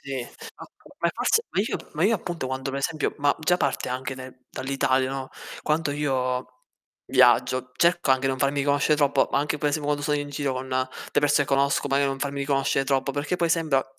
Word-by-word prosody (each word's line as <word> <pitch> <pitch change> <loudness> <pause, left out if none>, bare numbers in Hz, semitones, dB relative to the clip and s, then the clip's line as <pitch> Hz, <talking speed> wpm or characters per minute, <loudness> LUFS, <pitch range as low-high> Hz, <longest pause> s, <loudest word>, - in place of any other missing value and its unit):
Sì. 135 -2 -4 0.4
Ma - - -10 0.3
ma - - +1
forse 455 - +2
ma 195 - +1
io 215 - -1
p - - -14
ma 155 +3 0
io 225 +3 +4
appunto 170 -7 -4
quando 130 +1 -3
per 135 - -3
esempio 155 +2 -1
ma 145 0 +3
già 180 +3 +3
parte 140 -6 -1
anche 130 +1 -3
nel 130 0 -10
dall'Italia, 130 0 0
no. 135 -1 -4 0.3
Quando 155 -1 0
io 130 -3 -1 0.6
viaggio 130 0 +3
cerco 170 -4 +2
anche 130 0 +3
non 130 0 -1
farmi 140 +1 +1
conoscere 145 +1 +2
troppo, 145 -2 +2
ma - - +3
anche 150 +1 -1
poi 145 -1 0
se 155 - 0
quando 145 0 -1
sono 150 0 +1
in 145 0 -4
giro 140 -1 -2
con 130 +1 -5
delle 130 0 -2
persone 145 -1 +3
che 140 - +1
conosco, 140 +1 +1
magari 140 +1 +2
non 135 - -3
farmi 140 0 -3
riconoscere 135 -1 +1
troppo, 135 +1 0
perché 150 +5 -2
poi 170 -2 +1
sembra 155 -5 +2
140 Hz, 215 wpm, -25 LUFS, 130-150 Hz, 0.6 s, io